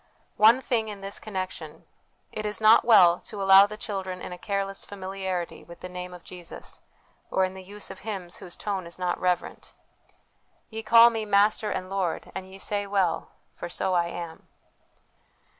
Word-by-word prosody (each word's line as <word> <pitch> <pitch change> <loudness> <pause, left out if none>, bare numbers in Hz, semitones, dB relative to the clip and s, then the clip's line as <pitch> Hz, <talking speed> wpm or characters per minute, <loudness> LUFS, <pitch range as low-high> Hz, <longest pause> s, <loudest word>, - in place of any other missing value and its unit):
One 225 +5 +6
thing 230 -4 0
in 205 -2 -7
this 195 0 -3
connection: 190 -3 -6 0.5
it 215 - -5
is 210 0 -2
not 220 +1 +7
well 180 -7 +6
to 210 - -9
allow 195 0 +8
the 210 +1 -8
children 190 -4 -4
in - - -7
a - - -8
careless 195 0 -2
familiarity 190 -2 -5
with 170 0 -13
the 180 - -6
Name 180 0 -6
of 180 -1 -11
Jesus, 175 -2 -8 0.5
or 190 - +2
in 185 - -5
the 190 - -9
use 205 +2 -8
of 190 - -10
hymns 190 -5 -5
whose 175 - -9
tone 195 -4 -3
is 170 - -10
not 180 -1 -1
reverent. 180 -1 -2 0.5
" - - -42
Ye 220 0 -4
call 230 +2 +7
Me 225 -1 -2
Master 210 +1 +3
and 185 - -3
Lord; 190 -3 -2
and 190 0 -6
ye 190 - -11
say 205 +1 -2
well, 195 -3 0 0.2
for 175 - -7
so 185 - -1
I 170 -1 +2
am." 170 -1 -7
195 Hz, 185 wpm, -26 LUFS, 180-210 Hz, 0.5 s, allow